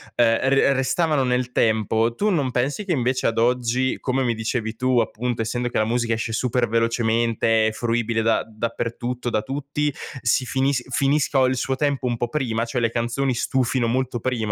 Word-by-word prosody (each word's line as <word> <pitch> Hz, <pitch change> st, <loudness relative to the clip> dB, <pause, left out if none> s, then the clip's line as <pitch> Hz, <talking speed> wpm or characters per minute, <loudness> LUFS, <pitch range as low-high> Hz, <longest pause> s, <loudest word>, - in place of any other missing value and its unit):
ehm, 115 Hz, -1 st, +4 dB
r 135 Hz, 0 st, +4 dB
restavano 145 Hz, +2 st, +1 dB
nel 125 Hz, 0 st, -1 dB
tempo. 110 Hz, +1 st, +2 dB
Tu 205 Hz, -, 0 dB
non 145 Hz, -9 st, 0 dB
pensi 135 Hz, +11 st, -1 dB
che 195 Hz, -, -4 dB
invece 130 Hz, -3 st, +1 dB
ad 115 Hz, 0 st, -1 dB
oggi, 125 Hz, +2 st, +1 dB
come 130 Hz, 0 st, 0 dB
mi 120 Hz, -2 st, +1 dB
dicevi 110 Hz, 0 st, -3 dB
tu, 125 Hz, +1 st, +2 dB
appunto, 115 Hz, +1 st, -2 dB
essendo 120 Hz, +2 st, -2 dB
che -, -, -3 dB
la 110 Hz, -, +2 dB
musica 115 Hz, 0 st, 0 dB
esce 115 Hz, 0 st, -3 dB
super 125 Hz, +1 st, 0 dB
velocemente, 115 Hz, 0 st, +1 dB
è -, -, 0 dB
fruibile 115 Hz, 0 st, -1 dB
da 115 Hz, 0 st, +2 dB
dappertutto, 115 Hz, +2 st, -4 dB
da 110 Hz, -, 0 dB
tutti, 145 Hz, +3 st, -2 dB, 0.3 s
si 115 Hz, +2 st, +1 dB
finis 135 Hz, 0 st, 0 dB
finisco 140 Hz, -1 st, +2 dB
il 130 Hz, 0 st, +1 dB
suo 130 Hz, +1 st, -1 dB
tempo 140 Hz, -2 st, 0 dB
un 120 Hz, -1 st, -1 dB
po' 120 Hz, -, -1 dB
prima, 120 Hz, -4 st, -1 dB
cioè 120 Hz, +1 st, -2 dB
le 115 Hz, -1 st, +1 dB
canzoni 120 Hz, +3 st, -1 dB
stufino 125 Hz, 0 st, 0 dB
molto 130 Hz, +2 st, 0 dB
prima? 125 Hz, +1 st, -1 dB
120 Hz, 185 wpm, -23 LUFS, 115-130 Hz, 0.3 s, ehm